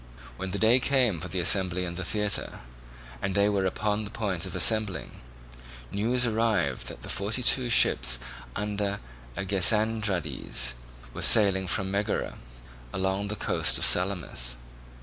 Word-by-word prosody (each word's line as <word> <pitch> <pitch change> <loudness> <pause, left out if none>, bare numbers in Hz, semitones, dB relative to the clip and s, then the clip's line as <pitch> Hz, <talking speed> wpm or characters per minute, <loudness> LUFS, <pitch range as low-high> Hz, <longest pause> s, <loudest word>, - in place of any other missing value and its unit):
When 95 0 -5
the 95 - -3
day 115 +4 +5
came 125 - +2
for - - -6
the 95 - -6
assembly 90 0 +2
in 85 - -5
the 95 +2 -5
theatre, 105 +2 -2 0.6
and 95 -1 -2
they 100 0 +3
were 100 -2 0
upon 105 +3 -1
the 100 - -7
point 95 -5 -3
of - - -8
assembling, 110 -4 +1 0.7
news 120 +5 +1
arrived 110 - 0
that - - -8
the - - -8
forty 105 +6 -2
two 125 0 +2
ships 65 - +4 0.4
under 100 0 -2 0.4
Agesandridas 100 - +1 0.4
were - - -6
sailing 95 -3 +4
from 95 +2 -1
Megara 100 +2 -2 0.5
along 95 +2 -1
the 105 - -3
coast - - +1
of - - +2
Salamis. 90 -10 0
100 Hz, 145 wpm, -27 LUFS, 95-110 Hz, 0.7 s, day